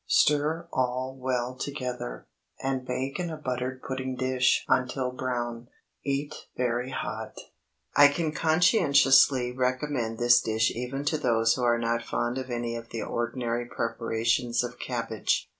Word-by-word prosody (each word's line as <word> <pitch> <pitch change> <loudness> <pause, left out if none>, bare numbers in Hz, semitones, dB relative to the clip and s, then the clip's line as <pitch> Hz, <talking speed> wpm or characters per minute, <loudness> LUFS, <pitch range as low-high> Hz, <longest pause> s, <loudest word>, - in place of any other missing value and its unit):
Stir 155 +3 +2
all 130 +1 -1
well 125 -1 -2
together, 125 - -5 0.3
and 135 -1 -2
bake 130 +3 -3
in 175 -1 -2
a 160 - -5
buttered 130 -2 -4
pudding 130 -1 -3
dish 130 0 +2
until 125 0 +1
brown. 120 -2 -3 0.4
Eat 140 +2 -3
very 125 0 0
hot. 130 - -5 0.6
I 145 - +9
can 155 +2 -1
conscientiously 145 - +4
recommend 125 -2 -1
this 120 +1 +5
dish 110 0 +1
even 125 +4 -4
to 155 +1 +1
those 115 -3 +3
who 130 - -3
are 120 -1 +3
not 115 0 0
fond 120 +2 -2
of 130 0 -6
any 120 -1 -2
of 115 0 -7
the 115 - -4
ordinary 120 0 -2
preparations 115 +1 0
of 120 0 -6
cabbage. 115 -4 -1
125 Hz, 140 wpm, -27 LUFS, 120-135 Hz, 0.6 s, I